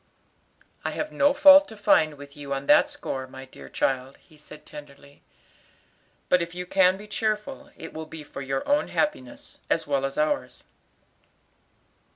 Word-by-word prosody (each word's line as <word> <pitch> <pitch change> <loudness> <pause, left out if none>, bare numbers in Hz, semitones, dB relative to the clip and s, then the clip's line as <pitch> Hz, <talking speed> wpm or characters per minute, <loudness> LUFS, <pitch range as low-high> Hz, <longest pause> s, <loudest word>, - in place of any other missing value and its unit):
"I - - -1
have 305 0 -4
no 285 0 +3
fault 285 +1 +8
to 220 - -11
find 155 -6 +3
with 145 0 -13
you 140 -1 -5
on 135 +1 -5
that - - +5
score, 130 -1 -5
my 130 +1 -11
dear 130 - -13
child," 130 0 -2
he 155 - -23
said 150 0 -13
tenderly, 140 -1 -13 1.1
"but 180 - +3
if 170 +1 -5
you 180 0 -5
can 185 0 +3
be 205 - -11
cheerful, 220 +7 -3
it 165 - -9
will 160 0 -7
be 155 -1 -9
for 145 - -9
your 135 0 -3
own 290 +1 +2
happiness, 130 - -3
as - - +1
well 140 -2 0
as 135 0 -3
ours." 150 0 -1
155 Hz, 170 wpm, -25 LUFS, 140-210 Hz, 1.1 s, fault